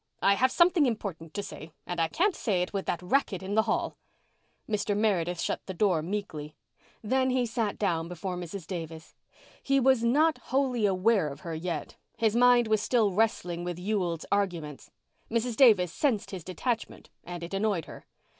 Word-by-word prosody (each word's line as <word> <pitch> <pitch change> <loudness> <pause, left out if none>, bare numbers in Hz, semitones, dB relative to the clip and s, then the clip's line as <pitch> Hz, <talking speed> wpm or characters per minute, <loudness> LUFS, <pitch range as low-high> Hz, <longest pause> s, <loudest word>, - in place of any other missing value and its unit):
"I 200 - +6
have 255 +6 +2
something 345 -3 +4
important 185 -9 -4
to 205 - -2
say, 155 -3 -9
and 175 -1 -4
I 165 - +3
can't 365 - +1
say 190 -6 0
it 180 - -7
with 195 -1 -3
that 175 - -2
racket 195 -2 0
in 195 +2 -4
the 220 - +5
hall." - - -1 0.7
Mr. 210 -1 -1
Meredith 180 -5 +1
shut - - -2
the 190 - -5
door 180 -4 +2
meekly. 160 -5 -5 0.5
Then 260 +4 +1
he 255 -1 +1
sat 225 -2 -2
down 170 -5 0
before 180 +1 -5
Mrs. 175 0 -6
Davis. 165 -3 -7 0.5
He 275 0 +2
was 260 -2 +3
not 300 +7 +3
wholly 255 -5 +1
aware 195 -1 +2
of 140 +1 -8
her 165 0 -5
yet. 170 +2 -4 0.2
His 225 -1 +1
mind 245 -1 +5
was 215 -1 +2
still 225 -2 +2
wrestling 180 -4 0
with 175 -1 -4
Ewald's 180 -4 -2
arguments. 170 -8 -2 0.4
Mrs. 230 +1 -1
Davis 205 - +5
sensed 250 -9 0
this 185 -4 -6
detachment 220 +7 -4
and 175 0 -7
it 170 - -7
annoyed 195 -4 0
her. - - -12
200 Hz, 180 wpm, -28 LUFS, 175-230 Hz, 0.7 s, I